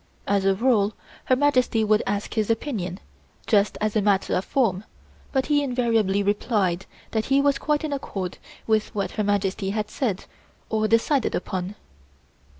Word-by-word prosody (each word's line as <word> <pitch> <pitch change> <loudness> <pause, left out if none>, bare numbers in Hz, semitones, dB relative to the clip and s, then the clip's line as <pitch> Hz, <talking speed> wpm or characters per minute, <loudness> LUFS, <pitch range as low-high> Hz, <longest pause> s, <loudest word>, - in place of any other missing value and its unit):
As 200 -1 +1
a 195 0 +4
rule, 215 -2 +2 0.3
Her 255 - +4
Majesty 255 -5 +2
would 215 0 +3
ask 205 +1 -2
his 215 -1 0
opinion, 215 - -2 0.5
just 205 -2 +2
as 215 0 -1
a 215 - +3
matter 200 -1 +2
of 185 - +1
form, 210 -8 +1 0.5
but 265 -1 +1
he 290 -1 +2
invariably 230 -7 +1
replied 200 -3 0 0.2
that 220 -1 0
he 275 +1 +3
was 280 0 +2
quite 300 0 0
in 305 -2 -2
accord 195 -10 -4 0.3
with 215 -1 0
what 200 - -1
Her 215 - -1
Majesty 200 -1 0
had 210 +1 -2
said 220 -9 -2 0.5
or 215 -1 +1
decided 230 +4 +2
upon. 185 +2 -3
215 Hz, 160 wpm, -24 LUFS, 200-250 Hz, 0.5 s, a